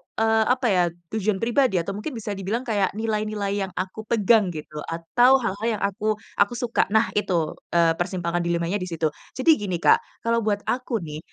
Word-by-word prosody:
eee, 220 0 +3
apa 255 0 +2
ya 180 -2 +4 0.3
tujuan 215 -1 -1
pribadi 240 -2 +2
atau 175 +2 0
mungkin 210 +7 -5
bisa 215 -2 -5
dibilang 200 +5 -3
kayak 205 -5 0
nilai-nilai 215 -2 -2
yang - - -12
aku 190 +4 -5
pegang 220 -2 +4
gitu, 155 -2 -6
atau 240 +11 +3
hal-hal 205 +1 -2
yang - - -8
aku 215 +2 0 0.2
aku 205 +4 +3
suka. 240 -1 0
Nah 220 +2 +2
itu, 175 -6 0 0.2
eee, 170 -1 +5
persimpangan 175 -1 -1
dilemanya 170 +3 -1
di 180 - -4
situ. 160 -3 -1 0.2
Jadi 300 0 +4
gini 195 -3 -2
Kak, 170 - +4 0.2
kalau 230 0 +2
buat 205 -2 -1
aku 245 -6 -2
nih, 150 -1 -6
205 Hz, 185 wpm, -24 LUFS, 180-225 Hz, 0.3 s, eee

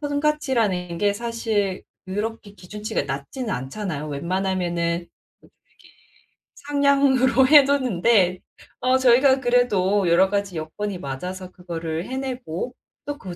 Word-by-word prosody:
성과치라는 265 - 0
게 205 +1 +2
사실 220 -4 -2 0.2
그렇게 210 +1 -4
기준치가 210 +3 -4
낮지는 140 - -5
않잖아요. 150 +1 -4
웬만하면은 175 +1 -1 0.4
이렇게 - - -23 1.0
상향으로 275 -3 +3
해 290 0 +8
놓는데 230 -8 +2 0.4
어 255 +1 +3
저희가 260 +1 +4
그래도 205 -6 +2
여러 185 +3 +4
가지 200 -3 -2
여건이 185 +6 -4
맞아서 180 +6 -6
그거를 165 -1 -5
해내고 255 -5 -4 0.3
또 290 0 -4
그 185 -6 -8
205 Hz, 285 characters per minute, -23 LUFS, 180-255 Hz, 1.0 s, 해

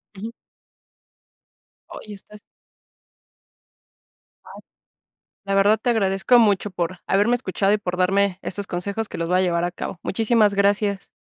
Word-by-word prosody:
Ujú. 215 +4 -7 1.6
Oye, 210 - -10
estas 210 +1 -15 2.0
¡Ay!, - - -13 0.8
la 195 0 -1
verdad 205 +2 +3
te 245 - -1
agradezco 210 +1 +3
mucho 205 -2 +2
por 180 0 -4
haberme 205 +5 +2
escuchado, 200 -4 0
y - - +2
por 180 -3 -5
darme 190 +1 +1
estos 200 0 -5
consejos 200 +5 -3
que - - -7
los 165 - -3
voy 180 +1 +2
a - - +3
llevar 170 -2 0
a 175 - -1
cabo. 175 - -7
Muchísimas 220 0 +2
gracias. 200 0 0
200 Hz, 140 wpm, -22 LUFS, 185-210 Hz, 2.0 s, verdad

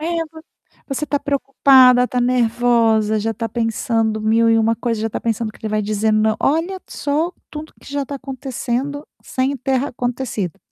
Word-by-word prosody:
É 320 - -3 0.2
voc 320 0 -13 0.4
você 275 +2 -2
tá 285 -1 -1
preocupada, 265 -3 +5
tá 250 0 -1
nervosa, 235 -3 +2
já 225 +2 -1
tá 225 +1 -4
pensando 225 -1 -1
mil 225 +1 +3
e 225 - +4
uma 225 +1 +2
coisa, 230 -1 -2
já 225 - -1
tá - - -5
pensando 225 -1 -2
que - - -18
ele 215 - -2
vai 215 0 +1
dizendo 215 +1 +1
"não" 220 0 +2
olha 335 +6 0
só 300 +4 -1 0.2
tudo 310 +1 -8
que - - -13
já 285 0 -2
tá 280 +1 -6
acontecendo 270 +1 -4 0.2
sem 265 +1 -1
ter 265 0 0
acontecido. 245 - -3
245 Hz, 180 wpm, -19 LUFS, 225-275 Hz, 0.4 s, preocupada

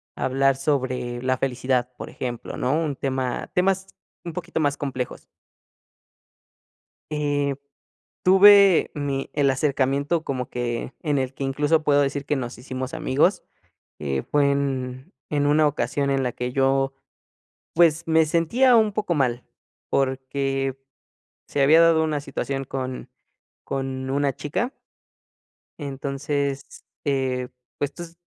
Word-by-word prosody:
hablar 135 +1 +2
sobre 130 -3 -1
la 130 0 +1
felicidad, 125 -1 0
por - - -8
ejemplo, 120 -2 -5
¿no?, 130 - 0
un 155 -3 0
tema 130 -2 -2
temas 190 +1 +1 0.4
un 170 - -6
poquito 175 -1 -4
más 145 -2 +1
complejos. 130 -3 -4 1.8
Eh, 145 -2 0 0.7
tuve 195 -1 +7
mi 140 -2 -3
el 145 -2 +2
acercamiento 140 +3 +1
como 130 -2 -3
que 120 0 -3
en 150 -3 0
el 130 0 -1
que, 135 - -5
incluso, 145 +4 +1
puedo 145 -1 +4
decir 140 0 -1
que 145 - 0
nos 120 -4 -4
hicimos 130 +1 -5
amigos. 145 +9 +1 0.6
Eh, 70 -3 -2
fue 145 -1 +3
en 130 -2 -2 0.2
en 145 -1 +1
una 150 +1 +4
ocasión 140 0 0
en 135 -1 +1
la 125 - 0
que 125 0 -4
yo, 135 0 +2 0.8
pues, 165 -1 +4
me 160 0 +4
sentía 230 +11 +3
un 215 -2 +3
poco 210 -4 -1
mal, 125 -4 0 0.5
porque 135 0 -1 0.7
se 145 - -1
había 155 +4 +7
dado 165 -1 +5
una 155 -2 -1
situación 135 -1 -3
con 130 -1 -5 0.6
con 130 -1 -3
una 140 0 +1
chica. 230 - -2 1.1
Entonces, 140 0 -2 0.4
eh, 130 -3 0 0.3
pues, 145 0 -2
tú 175 - -7
s 170 -1 -10
140 Hz, 130 wpm, -24 LUFS, 130-150 Hz, 1.8 s, tuve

